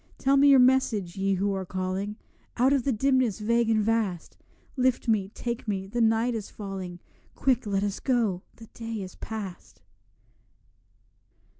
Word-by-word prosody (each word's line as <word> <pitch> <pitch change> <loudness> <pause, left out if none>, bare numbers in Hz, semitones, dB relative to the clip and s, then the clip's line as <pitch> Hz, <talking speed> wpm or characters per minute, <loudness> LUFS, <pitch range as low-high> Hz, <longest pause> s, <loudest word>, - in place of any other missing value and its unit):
Tell 275 +1 +2
me 280 +1 +6
your 275 -1 +8
message, 250 -8 +3
Ye 195 0 +1
who 200 +2 0
are 190 -1 -2
calling 185 +3 -3 0.4
Out 260 +3 +4
of 270 -4 +1
the 275 - +2
dimness 255 -2 +2
vague 230 +2 +1
and 215 -1 +3
vast; 215 -6 -1 0.4
Lift 255 -2 +1
me, 205 -4 +1
take 235 -1 -4
me, 195 -2 -2
the 235 +5 -2
night 225 +2 +2
is 220 -3 -5
falling; 190 -4 -7 0.4
Quick, 250 -4 +1
let 200 -1 0
us 205 -1 -2
go, 230 -9 0
the 230 - -12
day 225 -3 -5
is 185 - -9
past. 210 -5 -8
220 Hz, 160 wpm, -27 LUFS, 195-245 Hz, 0.4 s, your